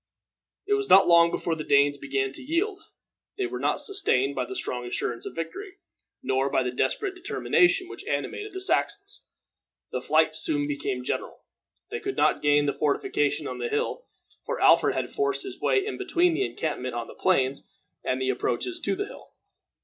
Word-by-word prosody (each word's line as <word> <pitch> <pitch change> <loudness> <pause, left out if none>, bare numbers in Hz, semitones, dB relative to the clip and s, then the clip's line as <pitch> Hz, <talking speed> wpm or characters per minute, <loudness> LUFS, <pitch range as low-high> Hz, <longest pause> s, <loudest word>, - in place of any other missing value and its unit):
It 410 - +1
was 410 -1 0
not 195 - +8
long 170 -1 +6
before 170 - -2
the 160 -1 -4
Danes 140 0 +3
began 135 -1 -1
to - - -8
yield. 360 +8 -1 0.6
They 390 - 0
were 375 +1 -4
not - - 0
sustained 140 - +1
by 130 -2 -2
the - - -7
strong 125 -1 -2
assurance 120 -1 -3
of - - -8
victory, 370 - -6 0.5
nor 135 +1 +1
by 130 - +1
the 125 - -2
desperate 135 - 0
determination 360 0 +2
which - - -9
animated 420 0 -3
the 375 0 -6
Saxons. 400 +1 -1 0.6
The - - -3
flight - - +2
soon 295 -3 +1
became 310 +7 -3
general. - - -4 0.5
They 455 - -3
could 400 -2 -4
not - - +3
gain 145 0 +4
the 140 - +1
fortification 395 - 0
on - - -6
the 470 - -2
hill, 460 +3 -2 0.4
for - - -3
Alfred - - +5
had - - -2
forced 415 -2 0
his 385 - -8
way 400 - +2
in 425 - -5
between 355 -2 +2
the 390 +4 0
encampment 130 -6 -4
on 120 -1 -3
the - - -11
plains 140 -7 +1 0.3
and 130 - -1
the 130 0 +1
approaches 130 - -2
to 390 - 0
the 405 +2 -2
hill. - - -13
310 Hz, 190 wpm, -26 LUFS, -, 0.6 s, not